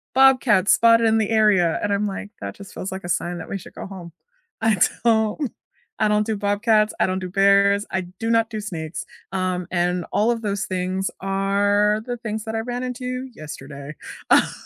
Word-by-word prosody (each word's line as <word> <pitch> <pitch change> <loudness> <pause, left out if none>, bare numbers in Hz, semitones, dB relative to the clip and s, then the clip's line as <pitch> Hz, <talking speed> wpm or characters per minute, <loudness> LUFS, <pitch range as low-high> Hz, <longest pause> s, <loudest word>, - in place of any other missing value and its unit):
"Bobcats 255 -7 +5
spotted 230 0 +5
in 220 0 +3
the 215 -2 0
area," 205 -6 +3
and 205 - 0
I'm 200 +1 0
like, 200 +1 -5
"That - - -5
just 200 -1 -12
feels 185 - -5
like 190 0 -6
a 175 - -6
sign 175 0 -1
that - - -8
we 195 - -2
should 190 - -12
go - - -7
home." 180 -3 -9 0.5
I 220 -3 +3 0.3
don't 220 +3 +2 0.5
I 215 - +3
don't 210 0 +2
do 220 -1 -1
bobcats, 210 +1 +2
I - - +4
don't 185 0 -1
do 185 - -5
bears, 200 +2 +4
I 190 - 0 0.2
do 225 - -2
not 225 -1 +3
do 215 -2 -4
snakes, 165 -5 -5 0.3
um, 185 -2 -2
and 180 0 0
all 220 +3 +2
of 230 -1 -2
those 200 -1 -2
things 185 +1 -2
are 200 +2 +2
the 245 -1 -3
things 220 -2 -4
that 220 0 -4
I - - 0
ran 245 +2 -4
into 255 +1 -4
yesterday. 145 -1 -9 0.4
Oh - - +5
205 Hz, 200 wpm, -22 LUFS, 185-225 Hz, 0.5 s, Bobcats